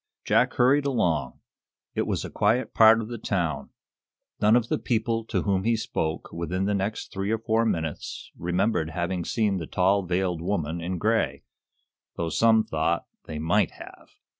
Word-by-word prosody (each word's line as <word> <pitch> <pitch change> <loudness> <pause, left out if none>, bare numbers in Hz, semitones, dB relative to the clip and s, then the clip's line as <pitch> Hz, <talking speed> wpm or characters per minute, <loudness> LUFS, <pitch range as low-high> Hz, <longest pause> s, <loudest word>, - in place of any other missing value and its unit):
Jack - - +3
hurried 140 +3 +4
along. 85 - 0 0.5
It - - -1
was - - -1
a - - -7
quiet 110 +5 +1
part 110 0 +7
of 110 - -6
the 120 -1 -6
town. 90 -7 -2 0.7
None 105 +2 +5
of 120 -1 +2
the - - -1
people 115 -1 0
to - - -1
whom 95 -2 +1
he 115 +2 +2
spoke 80 -7 -3
within 90 +3 -2
the 105 - +1
next 100 +3 -3
three 95 0 -2
or 110 - +1
four 115 +1 +1
minutes 80 -7 -4
remembered 90 -1 0
having 85 +1 -2
seen 105 0 0
the 80 -4 -5
tall, 95 +2 +2
veiled 90 -2 -1
woman 85 -2 -2
in 90 +2 -3
gray, 110 +5 0 0.7
though 85 -1 -2
some 110 +3 +4
"thought" 85 -4 -1 0.2
they 80 - -6
"might 80 +2 +2
have." - - -13
100 Hz, 170 wpm, -26 LUFS, 85-110 Hz, 0.7 s, part